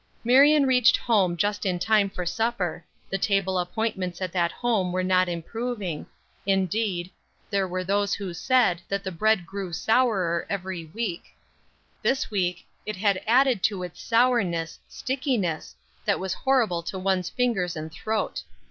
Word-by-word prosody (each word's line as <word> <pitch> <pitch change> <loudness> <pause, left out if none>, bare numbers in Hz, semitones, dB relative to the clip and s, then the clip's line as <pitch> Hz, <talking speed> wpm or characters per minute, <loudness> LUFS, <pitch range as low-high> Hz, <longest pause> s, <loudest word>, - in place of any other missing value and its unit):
Marion 280 +4 +6
reached 250 -2 +5
home 195 -7 +2
just 205 +3 0
in 185 -3 0
time 205 +2 +3
for 180 -2 -5
supper; 180 -3 -1 0.3
the 195 - -1
table 190 -2 +1
appointments 185 -1 -2
at 185 -2 -3
that 175 -1 +1
home 215 -7 0
were 185 +1 0
not 185 0 +3
improving; 195 0 -4 0.4
indeed, 190 -1 0 0.4
there 195 -2 +1
were 185 0 -3
those 200 +2 +1
who 195 -3 -5
said, 220 -4 +2
that 200 0 -2
the 190 - -3
bread 215 +1 +2
grew 195 +1 -5
sourer 195 -4 +1
every 185 -3 -4
week; 180 +1 -4 0.8
this 270 -2 0
week, 180 -4 -1 0.2
it 215 - -4
had 195 0 +1
added 250 -2 +4
to 195 -3 0
its 180 -2 -8
sourness, 225 -9 +1
stickiness, 250 - -2 0.3
that 200 - +1
was 190 -1 -2
horrible 230 -11 +1
to 170 +3 -5
one's 185 -1 0
fingers 210 -9 0
and 155 0 -6
throat. 215 +5 -2
195 Hz, 150 wpm, -26 LUFS, 180-225 Hz, 0.8 s, Marion